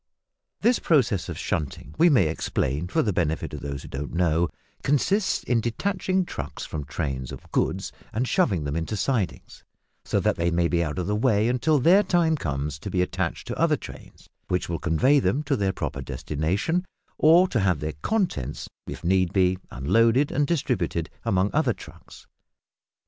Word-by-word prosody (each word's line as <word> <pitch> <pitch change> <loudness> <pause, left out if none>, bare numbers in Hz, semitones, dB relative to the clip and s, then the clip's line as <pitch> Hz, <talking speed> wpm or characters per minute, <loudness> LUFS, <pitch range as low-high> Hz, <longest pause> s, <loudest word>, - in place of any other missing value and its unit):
This 240 +2 +3
process 120 - +2
of 85 - -5
shunting, 75 -5 -3
we 170 +2 +5
may 125 - +5
explain 75 0 -1
for - - +1
the 105 - 0
benefit 80 -3 -1
of 75 - -5
those 70 -1 -5
who - - -10
don't 70 +4 -5
know, 85 -1 +2 0.3
consists 185 +9 +1
in 120 -2 +1
detaching 185 - -1
trucks 75 - -6
from 75 -2 -5
trains 65 -4 -4
of - - -11
goods 95 +1 0 0.2
and 120 +4 -1
shoving 110 - +2
them 70 0 -3
into 85 +6 -2
sidings, 115 -5 -2 0.4
so - - 0
that - - +1
they 85 +1 +1
may 85 0 +2
be 85 0 +1
out 75 0 -4
of 90 - -1
the 105 - 0
way, 110 -1 +2
until 125 +6 +2
their 170 +9 +6
time 175 -4 +2
comes 75 - -3
to 100 - -6
be 90 -1 +1
attached 90 -1 -3
to - - -4
other - - +3
trains, - - -12 0.2
which 90 0 -1
will 85 -1 -3
convey 110 - +3
them 140 +2 0
to 135 - 0
their 100 -2 +1
proper 70 -6 -4
destination, 90 - -1 0.4
or 170 +4 +6
to 120 - 0
have 90 -6 +2
their 75 +1 -3
contents, 170 - -1 0.2
if - - -7
need 90 0 +2
be, 95 -1 +2
unloaded 115 - +2
and 145 +1 +1
distributed 125 - -1
among 95 +1 +2
other - - +2
trucks. - - -14
95 Hz, 180 wpm, -25 LUFS, -, 0.4 s, their